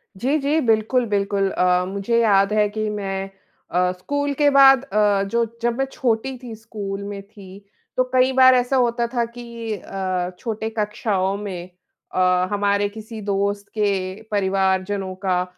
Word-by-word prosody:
जी, 265 +10 0
जी, 290 +3 +1
बिल्कुल, 225 +3 +2
बिल्कुल। 200 -1 0
अ, 180 0 +2
मुझे 200 +4 0
याद 200 -2 +3
है 210 -1 +3
कि 215 0 -3
मैं 195 -2 -3 0.4
अ, 180 +1 +2
स्कूल 285 +10 -2
के 290 +1 +3
बाद 270 -1 +7
अ, 205 -2 +2
जो 235 0 +2 0.2
जब 240 +1 0
मैं 270 - +1
छोटी 255 +1 -1
थी, 235 -2 -7
स्कूल 205 -3 -6
में 200 -1 -6
थी, 200 -1 -14 0.3
तो 255 - +4
कई 255 +1 +4
बार 260 0 +7
ऐसा 250 +2 +1
होता 235 0 0
था 240 -2 +1
कि 235 -2 -6
अ, 185 -2 -3
छोटे 220 -2 -3
कक्षाओं 205 -2 0
में 185 -4 -6 0.4
अ, 180 0 +2
हमारे 205 0 +1
किसी 220 +1 -9
दोस्त 200 0 -1
के 210 -1 +2 0.4
परिवारजनों 190 -1 0
का 180 -1 +2
205 Hz, 160 wpm, -22 LUFS, 195-235 Hz, 0.4 s, बाद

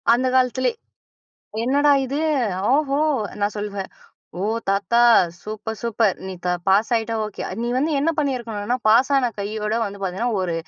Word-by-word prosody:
அந்த 255 +2 +1
காலத்திலே, 255 0 +2 0.9
"என்னடா 285 +3 +3
இது! 280 +4 -2 0.5
ஓஹோ!" 285 -1 +1 0.4
நான் 205 +1 0
சொல்வேன். 200 -2 -5 0.5
ஓ! - - -2 0.3
தாத்தா 195 +3 +1 0.4
சூப்பர்! 215 +1 -6
சூப்பர்! 225 -4 +1
நீ 190 - -5
த - - +1 0.2
பாஸ் 200 +5 +3
ஆயிட்டா 225 0 -1
ஓகே. 210 - -8 0.2
நீ 240 - -1
வந்து 295 +5 +1
என்ன 310 +4 +2
பண்ணியிருக்கணுனா, 240 -5 -1
"பாஸான 255 +3 +4
கையோட 210 +1 -3
வந்து 200 -1 -6
பாத்தீங்கன்னா, 195 +6 -2
ஒரு 180 -2 -2
230 Hz, 140 wpm, -22 LUFS, 205-260 Hz, 0.9 s, பாஸான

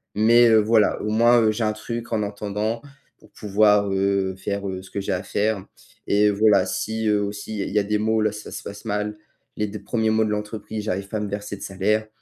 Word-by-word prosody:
mais 115 +3 +6
heu, 110 - +6
voilà, 110 0 +3
au 105 - -2
moins, 120 +2 +5
heu, 110 - +3
j'ai 110 +2 -2
un 110 0 +1
truc 115 +2 -6
en 110 - 0
entendant 105 +2 -3 0.4
pour - - -20
pouvoir, 105 -1 +2
heu, 95 -1 0
faire, 100 +1 -4
heu, 95 -1 -4
ce 95 - -14
que 100 - -3
j'ai - - -3
à 90 - -2
faire. 105 -1 -1 0.4
Et 105 +1 +4
voilà, 105 0 +4
si 110 0 -2
heu, 105 -1 +2
aussi 100 +1 -5
il - - -4
y - - 0
a - - -2
il - - -6
y 105 - +4
a - - +1
des 105 +1 0
mo 110 +1 +1
là 110 -1 +2
ça 105 0 -9
se - - -7
passe 100 0 -9
mal. 105 0 -2 0.4
Les 105 - -1
2 105 +1 -7
1res 110 -2 0
mois 110 0 +2
de 105 - -2
l'entreprise, 105 0 -4
j'arrive 100 -2 -2
pas 110 - -3
à - - -2
me 105 -1 -3
verser 100 0 -5
de - - -14
salaire. 105 +3 0
105 Hz, 255 wpm, -23 LUFS, 100-110 Hz, 0.4 s, mais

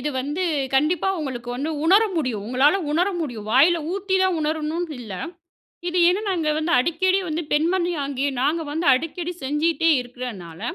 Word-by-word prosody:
இது 295 +4 -2
வந்து 295 +7 -3 0.3
கண்டிப்பா 310 +7 +2
உங்களுக்கு 250 -5 -5
வந்து 295 +5 -2
உணர 390 +6 +6
முடியும். 250 -10 -2
உங்களால 265 - +3 0.2
உணர 355 +5 +2
முடியும் 225 -8 -6
வாயில 325 +7 +5
ஊத்தி 390 -1 -2
தான் 375 -2 +2
உணரணுனு 315 +2 -2
இல்ல. 215 -5 -7 0.7
இது 355 +1 -1
ஏனா, 365 +4 +3
நாங்க 330 -5 0
வந்து 315 +2 -1
அடிக்கடி 370 +7 +2
வந்து 320 +2 -2
பெண்மணியாகிய 295 -4 0
நாங்க 310 +5 +1
வந்து 325 +3 -2
அடிக்கடி 330 +5 -3
செஞ்சிட்டே 325 +4 +1
இருக்கறனால 235 -10 -8
310 Hz, 150 wpm, -23 LUFS, 265-345 Hz, 0.7 s, உணர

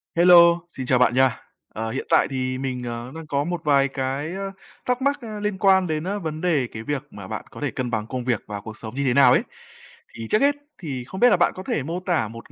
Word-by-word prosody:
Hello, 170 0 +7
xin 130 -6 -6
chào 125 0 +2
bạn 125 - +4
nha. 130 -1 +3 0.4
Ờ, 110 +1 -4
hiện 130 - -4
tại - - +4
thì 130 -1 -2
mình, 130 -2 -4
à, 120 +2 -6
đang 160 -1 -8
có 140 -1 0
một 175 +1 -3
vài 140 -2 +4
cái, 135 +3 -3
a, 195 0 -4 0.3
thắc 250 +1 0
mắc, 280 +1 +1
a, 215 -3 -7
liên 210 -1 -2
quan 190 -2 +4
đến, 155 -1 -2
a, 195 +3 -2
vấn 160 -5 -5
đề 155 -8 +1
cái 110 - -7
việc 145 +2 -3
mà 100 -2 -9
bạn 110 -1 -5
có - - -11
thể 145 -3 -1
cân 125 +1 -3
bằng 110 -2 -2
công 125 0 -4
việc 120 -4 0
và 105 -1 -6
cuộc 110 +2 -9
sống 110 +1 -8
như 140 - -1
thế 125 - +3
nào 135 -2 +6
ấy. - - +4 0.7
Thì 115 -1 -7
trước 215 - +2
hết 285 +1 +4 0.2
thì 135 -8 -5
không 190 +9 -8
biết 245 - +6
là 205 - +4
bạn 170 - +3
có 185 - -7
thể 155 - -2
mô 165 +5 -3
tả 175 - 0
1 115 +2 -11
140 Hz, 270 wpm, -23 LUFS, 125-180 Hz, 0.7 s, Hello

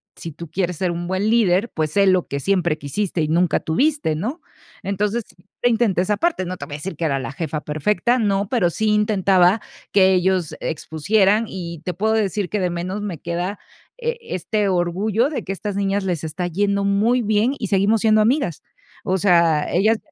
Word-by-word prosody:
si 165 - -7
tú 165 +1 -10
quieres 180 0 -1
ser 180 0 0
un 175 0 -4
buen 190 +3 0
líder, 220 -2 +3
pues, 155 -2 -1
sé 200 +4 +3
lo 185 -2 +3
que 140 - -3
siempre 175 -3 +1
quisiste 165 +4 -2
y 155 - 0
nunca 170 +2 +2
tuviste", 275 - +1
¿no? 250 - -4 0.4
Entonces, 205 +4 -1 0.4
intenté 225 -6 +2
esa 205 +3 0
parte, 330 - 0
no 185 +1 -5
te - - -7
voy 145 - -7
a - - -5
decir 165 +3 -6
que 170 - -2
era 140 -3 +1
la 130 - -5
jefa 155 +1 -4
perfecta, 210 - 0
no, 200 -2 +1
pero, 230 -9 +2
sí 215 +5 -1
intentaba 200 -2 +3 0.3
que 190 -1 +5
ellos 185 -2 +1
expusieran, 195 +8 +1
y 170 -3 -6
te 180 - -2
puedo 215 +6 0
decir 205 -3 0
que 210 - -1
de 180 - 0
menos 180 +4 -4
me 190 -7 -5
queda, 175 +5 -3 0.4
eh, 475 0 -2
este 210 - -2
orgullo 190 +7 +1
de 300 - -4
que 195 - -3
estas 205 +1 -5
niñas 200 0 0
les 175 -5 -2
está 160 +3 -3
yendo 200 +3 0
muy 215 +5 +2
bien, 215 +4 +1
y 215 - -3
seguimos 200 +3 +2
siendo 215 -1 +4
amigas. 220 - 0 0.4
O 185 - +1
sea, 170 -5 +3
ellas 215 +5 +3
190 Hz, 195 wpm, -21 LUFS, 175-210 Hz, 0.4 s, que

